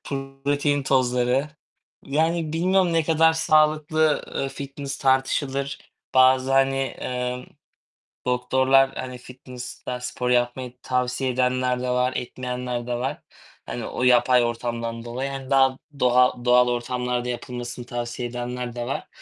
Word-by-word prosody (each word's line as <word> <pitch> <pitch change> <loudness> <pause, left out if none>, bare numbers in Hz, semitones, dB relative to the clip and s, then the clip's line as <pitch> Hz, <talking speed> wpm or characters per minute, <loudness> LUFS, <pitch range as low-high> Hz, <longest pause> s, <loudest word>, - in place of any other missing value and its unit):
protein 140 +1 -1
tozları, 130 +1 +1 0.5
yani, 160 +2 0
bilmiyorum 180 +2 +2
ne 165 -1 +3
kadar 160 0 +4
sağlıklı, 155 -1 +2
ııı, 135 - -2
fitness 140 +1 -6
tartışılır. 135 +1 0 0.4
Bazı, 130 0 +5
hani, 135 0 +2
ımm, 125 0 -3 0.8
doktorlar, 130 +2 +3
hani, 125 -1 -5
fitness'ta 125 0 -8
spor 125 0 -3
yapmayı 125 0 0
tavsiye 125 +1 -1
edenler 125 0 +1
de 125 - -2
var, 125 +1 +1
etmeyenler 125 -1 -4
de 120 - -1
var. 125 +2 -3 0.4
Hani, - - -5
o - - -4
yapay 125 0 +5
ortamdan 115 0 -3
dolayı, 130 +3 -3
hani, 135 -1 -7
daha 135 -1 +4 0.2
doğal 125 -1 +3
doğal 125 0 +5
ortamlarda 125 0 -2
yapılmasını 120 0 -5
tavsiye 120 0 -4
edenler 120 0 -5
de 120 0 -3
var, - - -4
125 Hz, 125 wpm, -24 LUFS, 125-135 Hz, 0.8 s, Bazı